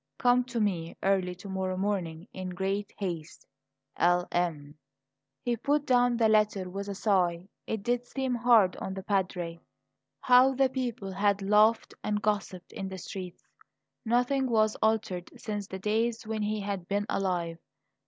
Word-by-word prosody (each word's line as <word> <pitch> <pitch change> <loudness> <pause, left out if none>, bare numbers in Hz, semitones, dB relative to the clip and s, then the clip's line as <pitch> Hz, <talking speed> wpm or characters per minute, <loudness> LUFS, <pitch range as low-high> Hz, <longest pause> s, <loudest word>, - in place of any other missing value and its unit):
Come 245 0 +4
to 240 -2 -3
me 180 -6 -1
early 190 -2 +1
to 190 - -11
morrow 190 -1 -2
morning. 185 -3 -2
In 185 -1 -5
great 195 +3 -2
haste, 170 -5 -5 0.5
"L. 175 0 +3
M." 155 -5 -1 0.7
He 240 -2 +1
put 290 +5 0
down 245 -2 +3
the 230 -1 +4
letter 210 -3 +2
with 200 +2 -5
a 200 - -4
sigh; 185 -4 +1 0.2
it 220 -3 -3
did 245 +1 0
seem 265 -2 -2
hard 230 -5 +4
on 190 - -5
the 190 - -6
Padre. 180 -4 -1 0.6
How 255 +1 +5
the 270 0 +3
people 240 -7 -3
had 200 +1 +1
laughed 210 +3 +4
and 210 -1 0
gossiped 200 -4 -2
in 195 - -5
the 190 - -6
streets! 180 0 -7 0.6
Nothing 250 +3 +1
was 215 -2 +3
altered 215 -5 0
since 205 -2 -4
the 190 - -6
days 220 +3 0
when 220 0 -3
he 210 0 -1
had 200 -3 -4
been 205 +1 0
alive. 175 -4 -1
200 Hz, 160 wpm, -29 LUFS, 185-225 Hz, 0.7 s, How